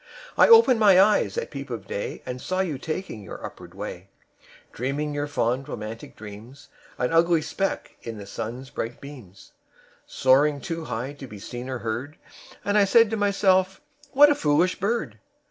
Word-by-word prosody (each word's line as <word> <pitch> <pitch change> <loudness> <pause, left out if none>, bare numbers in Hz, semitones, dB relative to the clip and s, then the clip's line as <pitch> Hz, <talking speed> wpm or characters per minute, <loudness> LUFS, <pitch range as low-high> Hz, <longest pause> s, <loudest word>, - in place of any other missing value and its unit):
"I - - +6
opened 450 - +7
my 200 -4 +6
eyes 190 - +3
at - - -3
peep 140 -1 -7
of 115 -5 -6
day 100 - -5
And 125 0 -6
saw 185 0 -1
you 160 -8 -3
taking 155 - -5
your 95 - -8
upward - - -11
way, 90 +2 -7 0.6
Dreaming 140 +5 -3
your 145 0 -2
fond 130 -1 -1
romantic 110 +2 -7
dreams, 115 +7 -12 0.3
An 125 +5 -1
ugly 165 -1 +3
speck 195 +5 -3
in 115 -2 -7
the 100 - -8
sun's 115 +5 -6
bright 115 +1 -5
beams; 120 -10 -13 0.6
Soaring 140 +3 +3
too 165 -1 -5
high 125 +4 -4
to 140 -2 -10
be 105 - -10
seen 120 +5 -7
or 130 - -3
heard; 120 +6 -5 0.5
And 205 +1 +3
I - - +6
said 225 +2 +5
to - - 0
myself: 195 -2 +2 0.3
'What 290 +2 +7
a - - +5
foolish 165 - +1
bird!' 230 +5 -2
145 Hz, 175 wpm, -25 LUFS, 120-185 Hz, 0.6 s, opened